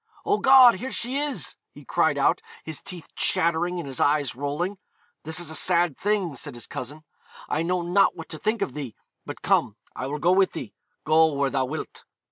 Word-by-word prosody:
'Oh 415 0 +2
God, 260 -4 +7
here 255 +7 -5
she 250 +3 -2
is!' 290 -2 -2 0.2
he - - -13
cried - - +1
out, - - +2 0.2
his 160 -2 -6
teeth 180 -4 -9
chattering 170 +2 +2
and 165 - -6
his 135 -2 -6
eyes 145 -4 +2
rolling. 150 - -3 0.5
'This 160 +3 -1
is 165 -2 -4
a - - -5
sad 170 -3 +3
thing,' 200 -5 -1
said 140 +1 -6
his 120 - -8
cousin: 145 +5 -7 0.5
'I 155 - 0
know 180 +2 0
not 180 +3 +3
what 165 -1 -9
to 155 - -7
think 215 +2 0
of 130 - -5
thee; 135 -7 -6 0.3
but - - -8
come, 105 - +2 0.2
I 130 - -4
will 145 +2 -3
go 170 +4 +2
with 190 0 +3
thee, 130 -10 -7 0.3
go 160 +1 +4
where 140 -1 0
thou 135 -1 0
wilt.' - - -7
160 Hz, 205 wpm, -25 LUFS, 145-185 Hz, 0.5 s, God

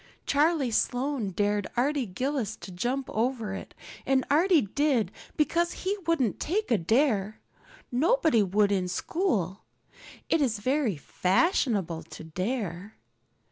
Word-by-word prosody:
Charlie 290 -3 +2
Sloane 250 -1 0
dared 205 +1 0
Arty 270 0 +1
Gillis 245 +1 -2
to 190 - -10
jump 250 +9 -2
over 225 -3 -1
it, 195 - -8 0.3
and 265 -1 +2
Arty 335 +2 +5
did 245 -2 +1 0.3
because 340 +3 +1
he 390 +2 +1
wouldn't 270 -10 +1
take 405 0 -1
a 230 - +4
dare. 215 - +1 0.5
Nobody 315 - +3
would 200 +1 +2
in 185 -2 +1
school. 195 - -1 0.6
It 330 - +2
is 240 -6 +1
very 255 - 0
fashionable 190 - +1 0.2
to - - -9
dare. 185 +2 -4
240 Hz, 125 wpm, -28 LUFS, 200-290 Hz, 0.6 s, Arty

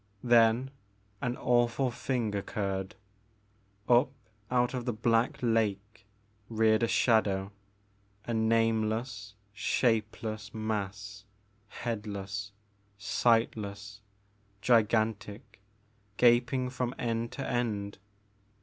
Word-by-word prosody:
Then 120 +1 +4 0.5
an 125 0 -2
awful 120 +1 +2
thing 120 -3 -2
occurred. 100 -1 -3 0.9
Up 125 +3 +5 0.4
out 125 0 +1
of 125 -2 -3
the 120 - -1
black 115 +2 +1
lake 105 -3 -1 0.4
reared 110 -1 +3
a 115 - +2
shadow, 100 -5 +2 0.7
a 120 - -3
nameless 110 -1 0 0.2
shapeless 110 -1 -1
mass, 105 -2 -4 0.4
headless, 100 -3 -5 0.5
sightless, 105 -1 0 0.6
gigantic, 110 -2 0 0.6
gaping 125 +2 +3
from 125 -1 -3
end 115 0 -2
to 135 - -4
end. 105 -5 -2
110 Hz, 85 wpm, -30 LUFS, 105-120 Hz, 0.9 s, Up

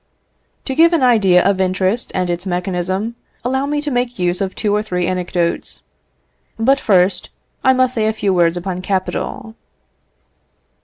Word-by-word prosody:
To 265 - -2
give 335 +4 +5
an 320 -5 +2
idea 195 -8 +4
of 195 -1 +1
interest 190 +4 0
and 180 -1 0
its 175 +2 -3
mechanism, 185 +4 -2 0.3
allow 265 +2 0
me 295 0 -1
to 295 -1 -2
make 245 -1 -1
use 180 0 0
of 190 -1 -2
two 210 -2 0
or 210 - +2
three 180 -4 -2
anecdotes. 180 -1 -2 0.7
But, 265 +5 +3
first, 190 -4 +2 0.3
I 260 - +5
must 255 -1 +2
say 220 -3 0
a 220 - +1
few 200 -3 0
words 170 -1 +2
upon 180 0 -4
capital. 195 +3 -3
195 Hz, 160 wpm, -18 LUFS, 180-245 Hz, 0.7 s, give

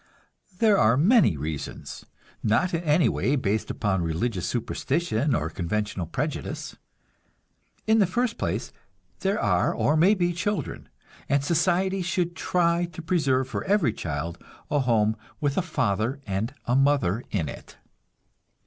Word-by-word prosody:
There 215 -1 +4
are 115 +3 +4
many 190 - +4
reasons, 75 +1 -6 0.3
not 165 - +1
in 165 0 -1
any 155 +1 +3
way 135 - +1
based 110 -5 -1
upon 95 -4 0
religious 90 +3 -1
superstition 130 - -1
or 75 0 -1
conventional 95 +1 -2
prejudice. 145 - -4 1.1
In 220 +1 +4
the 200 - +4
first 235 +5 -1
place, - - -2 0.5
there 195 +3 0
are - - +2
or 150 - +1
may 180 +7 +5
be 175 -2 +1
children, 205 +4 -3 0.4
and 140 0 +2
society 185 +4 +1
should 175 -1 -1
try 170 0 +1
to 170 -1 -9
preserve 140 -7 +1
for - - -4
every 190 - +2
child 80 +1 -5 0.3
a 145 - +3
home 110 -4 +2 0.2
with 145 -2 0
a - - +2
father 130 - -1
and 110 +6 -2
a 120 - +1
mother 135 -7 +2
in 85 -7 -1
it. - - -10
140 Hz, 140 wpm, -26 LUFS, 105-175 Hz, 1.1 s, may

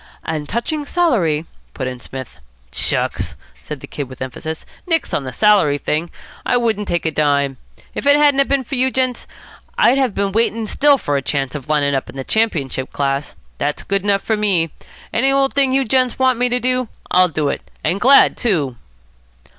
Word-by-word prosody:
"And 155 -3 -4
touching 295 +6 -2
salary 190 - +1
" - - -36
put 130 - -3
in 130 -1 -5
Psmith. 130 +1 -9 0.3
"Shucks!" - - 0 0.3
said 150 -3 -7
the - - -7
Kid 145 - -5
with 130 - -11
emphasis. 145 +5 -6 0.2
"Nix 330 -2 0
on 135 - -1
the 130 - -5
salary 195 -5 +3
thing. 155 +4 -2 0.3
I 245 - +2
wouldn't 220 -4 0
take 170 -1 -1
a 160 - +1
dime. 140 -3 +1 0.4
If - - -4
it 285 - +7
hadn't 290 -2 +4
a 275 - +5
been 275 -1 0
for 265 - -10
you 260 0 +3
gents, 255 -2 -1 0.5
I'd 260 +3 +4
have 255 -7 0
been 200 -1 0
waiting 225 +1 0
still 285 +6 +3
for 145 - -1
a - - -1
chance 135 -1 -2
of 150 0 -7
lining 145 -2 +2
up 135 - -2
in - - -11
the 135 - -4
championship 140 - -1
class. 140 0 -2 0.2
That's 145 +1 -2
good 195 0 0
enough 200 0 +1
for 220 - 0
me. 190 -7 +1 0.4
Any 270 +4 +3
old 275 0 +2
thing 275 -2 +3
you 270 0 +2
gents 255 0 +1
want 260 -2 +2
me 250 0 +2
to 245 +1 +1
do, 255 0 0 0.2
I'll 185 0 +5
do 155 -3 -1
it. - - -3 0.2
And 195 +3 0
glad, 275 +3 +6
too." 150 - 0
200 Hz, 200 wpm, -18 LUFS, -, 0.5 s, it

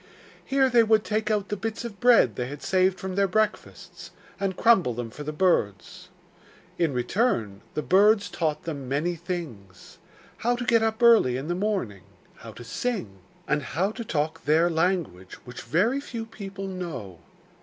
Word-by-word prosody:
Here 270 -1 +2
they 240 -2 +5
would 220 -1 +3
take 215 0 -1
out 205 -2 0
the 210 - -1
bits 225 +3 -4
of 205 -4 -8
bread 235 - +5
they 125 +2 -3
had 145 +2 -8
saved 185 0 +2
from 190 -1 -5
their 200 +1 +2
breakfasts 215 +3 -3 0.3
and 195 -2 -2
crumble 190 - +4
them 120 -1 -5
for 150 - -10
the 150 +1 -4
birds. 180 - -1 0.7
In 165 -4 +2
return, 120 - -1
the 150 - -2
birds 205 +2 +4
taught 155 -3 -2
them 140 -6 -6
many 155 +6 0
things: 150 - -8 0.4
how 240 +2 0
to 245 0 -4
get 230 -2 +4
up 225 +1 -1
early 220 - +5
in 140 +5 -6
the - - +1
morning, 185 - -2 0.4
how 115 - -10
to 120 +3 -11
sing, 120 - -4 0.3
and 150 0 +1
how 180 +8 -1
to 235 - -6
talk 155 -6 -2
their 160 +4 +3
language, 160 - -1
which 125 -1 -9
very 230 - +1
few 230 -5 -6
people 195 -3 -8
know. 165 - -6
180 Hz, 175 wpm, -26 LUFS, 140-215 Hz, 0.7 s, they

